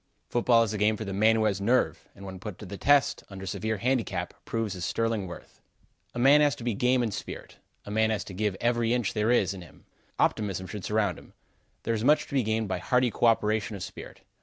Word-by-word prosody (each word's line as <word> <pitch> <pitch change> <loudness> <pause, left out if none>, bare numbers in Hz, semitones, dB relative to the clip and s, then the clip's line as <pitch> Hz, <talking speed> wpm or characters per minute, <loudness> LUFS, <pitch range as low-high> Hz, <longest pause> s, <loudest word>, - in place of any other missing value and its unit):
Football 120 -1 +4
is 110 -2 -2
a 105 - -3
game 105 +1 +2
for 110 - -5
the 100 - -4
man 110 +3 +4
who 110 - +1
has 100 -2 0
nerve, 120 +5 +1
and 100 - -11
when 95 -1 -8
put 105 -1 -7
to 105 - -10
the 100 - -7
test, 145 +6 +3
under 95 -1 -8
severe 110 +4 -2
handicap, 115 -6 -1
proves 115 -3 -2
his 90 -2 -6
sterling 115 -2 -1
worth. 85 - -11 0.5
A - - -4
man 135 +4 +6
has 145 -1 +3
to - - -10
be 120 -1 0
game 125 +4 +2
in 115 - -1
spirit. 105 - -7 0.3
A 105 - -7
man 110 +1 +2
has 110 -2 -1
to 95 - -10
give 100 0 -1
every 120 0 +1
inch 120 -5 -1
there 105 +1 0
is 100 -6 +3
in 95 - -9
him. 85 - -16 0.3
Optimism 100 -3 0
should 95 +2 -7
surround 105 -5 0
him. - - -18 0.5
There 115 - 0
is 110 -1 -2
much 150 +4 +4
to - - -12
be 135 - +3
gained 110 -1 -1
by 90 -1 -2
hearty 125 +6 +2
co 120 - +2
operation 110 -1 +1
of 95 - -6
spirit. - - -10
110 Hz, 240 wpm, -27 LUFS, 100-120 Hz, 0.5 s, man